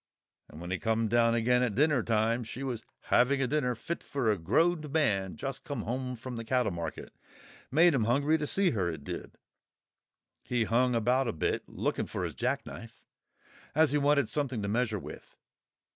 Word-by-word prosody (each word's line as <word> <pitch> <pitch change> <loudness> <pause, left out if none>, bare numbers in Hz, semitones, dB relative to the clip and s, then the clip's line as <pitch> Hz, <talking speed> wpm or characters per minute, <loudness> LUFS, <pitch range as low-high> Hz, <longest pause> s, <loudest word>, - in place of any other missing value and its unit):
And 75 - -11
when 90 +1 -6
he 95 - -1
come 115 -1 0
down 115 0 +3
again 125 +2 +3
at 120 -5 0
dinner 145 -2 +3
time 115 +2 +1
she 125 +4 -7
was 125 -4 -3 0.3
having 135 +3 +4
a 135 - +2
dinner 125 -2 0
fit 165 +9 -5
for 130 -6 0
a 105 - 0
growed 155 - +1
man 105 - +1
just 135 -1 -5
come 140 -7 -4
home 125 +2 -3
from 125 +1 -7
the 115 - -4
cattle 125 +1 +1
market—made 130 - -1
him 120 -6 +1
hungry 140 +7 +2
to 150 - -2
see 195 +2 +2
her, 95 -7 0
it 80 -4 -6
did; - - -7 1.0
he 120 -2 0
hung 120 +3 +2
about 125 +3 +2
a - - +1
bit 80 - -2
looking - - -2
for - - -4
his - - -3
jack - - -1
knife, - - -10 0.7
as 155 -2 +4
he 145 - +2
wanted 140 -3 +3
something 130 -7 -2
to - - -2
measure 110 0 0
with. - - -10
125 Hz, 190 wpm, -30 LUFS, 110-140 Hz, 1.0 s, having